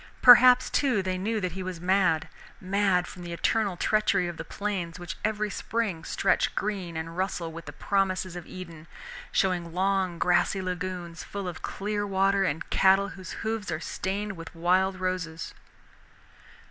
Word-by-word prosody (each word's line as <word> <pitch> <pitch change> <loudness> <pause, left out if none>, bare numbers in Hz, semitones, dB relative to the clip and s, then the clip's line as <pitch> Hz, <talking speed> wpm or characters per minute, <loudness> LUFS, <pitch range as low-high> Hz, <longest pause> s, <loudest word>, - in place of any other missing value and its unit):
Perhaps, 250 +1 +8
too, 250 -9 +2
they 185 0 -1
knew 220 +3 -1
that 185 -3 -2
he 190 +3 -6
was 185 -2 -5
mad, 180 -3 +2 0.3
mad 190 -1 +1
from 180 - -10
the 175 -1 -6
eternal 200 +1 0
treachery 200 -2 +2
of 175 -1 -6
the 165 - -5
plains, 180 -2 -4
which 175 +1 -6
every 215 -1 -1
spring 210 -9 -2
stretch - - +1
green 190 -5 -3
and 165 +1 -5
rustle 180 -3 -2
with 165 +1 -9
the - - -5
promises 190 -2 -1
of 175 -2 -8
Eden, 165 -4 -9 0.4
showing 175 -4 0
long 190 -2 +1
grassy 180 +3 +2
lagoons 180 -2 -4
full 200 -2 -5
of 175 -2 -6
clear 205 +1 -3
water 195 0 +2
and 160 -3 -2
cattle 195 +1 +4
whose 185 0 -9
hoofs 220 -2 -2
are 155 -2 -2
stained 195 +4 -3
with 165 0 -10
wild 185 +3 +2
roses. 180 -3 -3
185 Hz, 160 wpm, -27 LUFS, 175-200 Hz, 0.4 s, Perhaps